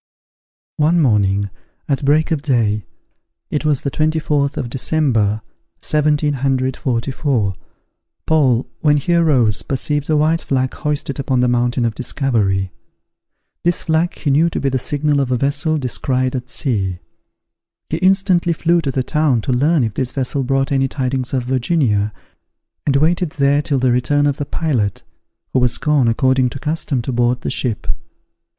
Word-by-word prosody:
One 160 +3 +3
morning, 100 - +2 0.4
at 140 0 -1
break 150 +4 +2
of 155 -3 0
day, 110 - 0 0.7
(it 150 - -2
was 150 -3 +1
the 140 - -2
24th 155 -2 0
of 125 - -2
December, 120 -6 0 0.4
1744,) 135 -5 0 0.7
Paul, 135 -6 +2
when 150 -2 +3
he 160 +5 0
arose, 135 -11 +3
perceived 145 +2 -1
a 155 - +3
white 160 +2 +2
flag 130 -1 -1
hoisted 145 -3 -3
upon 130 -2 0
the 125 - +3
Mountain 120 0 +1
of 115 - 0
Discovery. 105 - -1 0.9
This 175 0 +1
flag 165 +1 0
he 145 - -1
knew 160 +5 +3
to - - -3
be 140 - 0
the 130 0 -1
signal 145 +2 0
of 135 -2 0
a 125 - +1
vessel 145 +4 0
descried 130 -1 -1
at 125 0 -5
sea. 100 -11 -1 0.9
He 160 - 0
instantly 185 -1 +2
flew 170 +1 +1
to 145 - -3
the 130 -1 -1
town 150 -5 +1
to 130 - -2
learn 145 +3 +2
if 110 -2 -2
this 130 +2 -2
vessel 135 +1 -2
brought 135 +1 0
any 135 -1 +2
tidings 130 -1 -2
of 130 -2 -1
Virginia, 125 -5 0 0.8
and 140 - +2
waited 160 +3 +1
there 140 0 +2
till 145 -2 -1
the 130 -1 +2
return 145 +4 +1
of 145 -1 0
the 145 - -3
pilot, 125 - -1 0.5
who 130 - +3
was 125 -1 +2
gone, 150 -5 +2
according 130 +2 +2
to 130 - -7
custom, 150 -3 -2
to 130 - -3
board 120 0 +1
the - - -3
ship. 115 -5 -2
135 Hz, 160 wpm, -18 LUFS, 125-150 Hz, 0.9 s, One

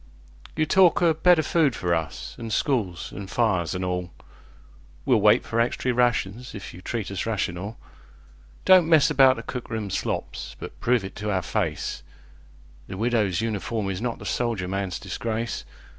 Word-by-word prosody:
You 155 - +2
talk 180 +1 +4
o' 165 -2 +5
better 160 +1 +4
food 155 -6 +2
for 90 -1 0
us, 80 -2 -3
an' 115 -1 -5
schools, 110 - -1
an' 95 0 -6
fires, 95 -6 0
an' 90 - -2
all:We'll 90 -2 -4
wait - - +5
for 115 - -1
extry 125 +2 0
rations 120 -1 0
if 100 - -8
you 90 - -11
treat 110 -1 -4
us 100 +2 -3
rational. 100 -1 -3 0.9
Don't 185 -3 +6
mess 160 -4 +5
about 135 -1 +6
the - - -7
cook 125 -2 -6
room 110 -4 -3
slops, - - -3
but - - -9
prove 120 -4 +1
it 95 - -8
to 105 +1 -3
our 95 -2 +1
faceThe - - -2 0.9
Widow's 110 -3 +1
Uniform 110 -2 -2
is 95 +1 -4
not 120 -1 -2
the - - -11
soldier 115 -7 -1
man's 95 -1 -2
disgrace. 115 +4 -4
110 Hz, 160 wpm, -25 LUFS, 95-125 Hz, 0.9 s, Don't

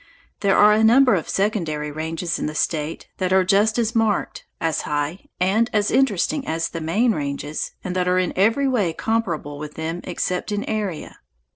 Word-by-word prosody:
There 195 -1 +2
are 210 0 +7
a 215 +1 +3
number 250 +2 +6
of 175 -5 -1
secondary 165 -8 -1
ranges 160 +3 -3
in - - -2
the 155 - -5
State 155 0 -2
that 185 -1 -1
are 190 0 +5
just 205 +4 +3
as 230 -1 0
marked, 220 -3 0
as 160 -2 0
high, 150 +5 -3
and 205 +6 +2
as 210 -1 +1
interesting 265 - +1
as 165 +1 -1
the 165 - -6
main 210 +10 +2
ranges, 145 -3 -3
and 180 0 -4
that 180 -1 0
are 180 0 +2
in 185 -2 0
every 225 +8 +3
way 210 -11 +1
comparable 170 -10 -2
with 150 0 -7
them 165 +2 -4
except 180 +2 -3
in 205 0 -1
area. 205 -7 -4
185 Hz, 185 wpm, -22 LUFS, 160-215 Hz, -, are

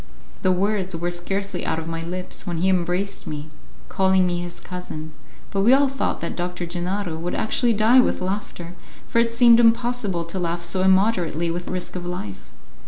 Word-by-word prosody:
The 185 - +3
words 190 -1 0
were 175 +1 -2
scarcely 195 +2 -3
out - - -1
of 160 0 -5
my 165 0 -3
lips 180 +3 -6
when 175 -2 -2
he 185 +3 +2
embraced 185 +2 -1
me, 150 +1 -6 0.4
calling 190 -1 +3
me 175 -1 0
his 175 0 -6
cousin, 160 -4 -7 0.4
but 195 - 0
we 230 +6 +6
all 280 +1 +5
thought 270 +1 -2
that 170 - -3
Doctor 180 0 -3
Gennaro 175 +1 -2
would 170 +2 -3
actually 235 +2 +1
die 220 +4 +5
with 250 - +2
laughter, 185 -2 -4 0.3
for 230 - +1
it 230 0 +2
seemed 235 0 +6
impossible 230 -6 +2
to 170 +3 -4
laugh 170 0 -2
so 170 +2 0
immoderately 185 -4 +2
without 175 +1 -4
risk 185 0 -4
of 180 - -4
life. 140 - -6
180 Hz, 185 wpm, -23 LUFS, 170-205 Hz, 0.4 s, we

